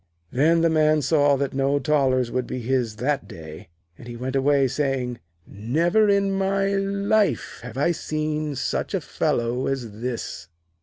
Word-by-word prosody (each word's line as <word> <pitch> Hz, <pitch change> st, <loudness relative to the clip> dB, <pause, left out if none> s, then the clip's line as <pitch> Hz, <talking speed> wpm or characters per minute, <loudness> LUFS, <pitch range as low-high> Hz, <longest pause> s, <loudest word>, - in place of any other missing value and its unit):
Then 160 Hz, +6 st, +3 dB
the 165 Hz, -, +4 dB
Man 155 Hz, -1 st, +3 dB
saw 145 Hz, -2 st, +3 dB
that 140 Hz, 0 st, -2 dB
no 135 Hz, +1 st, +1 dB
thalers 130 Hz, -4 st, +1 dB
would 125 Hz, -1 st, -2 dB
be 130 Hz, -, -4 dB
his 120 Hz, -2 st, -1 dB
that 135 Hz, +5 st, -1 dB
day, 80 Hz, -2 st, -10 dB, 0.3 s
and 120 Hz, -, -11 dB
he 120 Hz, -1 st, -7 dB
went 130 Hz, +2 st, -4 dB
away, 135 Hz, 0 st, +3 dB
saying: 130 Hz, -3 st, -2 dB, 0.3 s
'Never 165 Hz, -, +1 dB
in 200 Hz, -1 st, +2 dB
my 195 Hz, 0 st, +1 dB
life 200 Hz, +1 st, 0 dB
have 125 Hz, 0 st, -9 dB
I 145 Hz, +5 st, +2 dB
seen 155 Hz, -2 st, -2 dB
such 130 Hz, -, -2 dB
a -, -, +1 dB
fellow 120 Hz, +2 st, -1 dB
as 130 Hz, -5 st, -3 dB
this.' 125 Hz, -1 st, -4 dB
140 Hz, 160 wpm, -24 LUFS, 125-160 Hz, 0.3 s, the